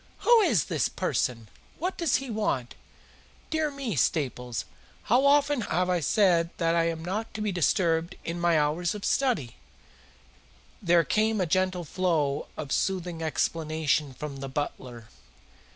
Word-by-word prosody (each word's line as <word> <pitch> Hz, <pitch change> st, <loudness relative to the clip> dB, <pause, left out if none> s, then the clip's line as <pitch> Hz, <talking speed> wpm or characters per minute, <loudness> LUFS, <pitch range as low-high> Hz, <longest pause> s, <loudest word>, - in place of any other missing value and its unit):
"Who 475 Hz, -1 st, +6 dB
is 230 Hz, -, +2 dB
this -, -, 0 dB
person? 115 Hz, -3 st, -2 dB, 0.3 s
What 365 Hz, +4 st, -2 dB
does 335 Hz, -6 st, +1 dB
he 265 Hz, -2 st, -2 dB
want? 135 Hz, -, -1 dB, 0.8 s
Dear 315 Hz, -1 st, +1 dB
me, 275 Hz, -, -4 dB
Staples, 125 Hz, -2 st, -1 dB, 0.4 s
how 255 Hz, +5 st, +3 dB
often 290 Hz, -2 st, +3 dB
have 180 Hz, -2 st, 0 dB
I 180 Hz, -, +2 dB
said 170 Hz, -1 st, +3 dB
that 165 Hz, -1 st, +1 dB
I 170 Hz, 0 st, +2 dB
am 165 Hz, -1 st, -3 dB
not 210 Hz, +5 st, -3 dB
to -, -, -4 dB
be 210 Hz, -1 st, 0 dB
disturbed 170 Hz, -1 st, +1 dB
in 170 Hz, +1 st, -3 dB
my 170 Hz, -1 st, +3 dB
hours 160 Hz, +5 st, 0 dB
of 205 Hz, -, -6 dB
study?" 235 Hz, -, 0 dB, 1.2 s
There 170 Hz, 0 st, +4 dB
came 215 Hz, +5 st, +1 dB
a 185 Hz, -, +2 dB
gentle 185 Hz, +1 st, 0 dB
flow 155 Hz, -4 st, 0 dB
of 145 Hz, -3 st, -6 dB
soothing 180 Hz, -3 st, -1 dB
explanation 155 Hz, -2 st, -1 dB
from 140 Hz, +1 st, -6 dB
the 135 Hz, 0 st, -6 dB
butler. 125 Hz, -5 st, -5 dB
170 Hz, 150 wpm, -27 LUFS, 150-215 Hz, 1.2 s, Who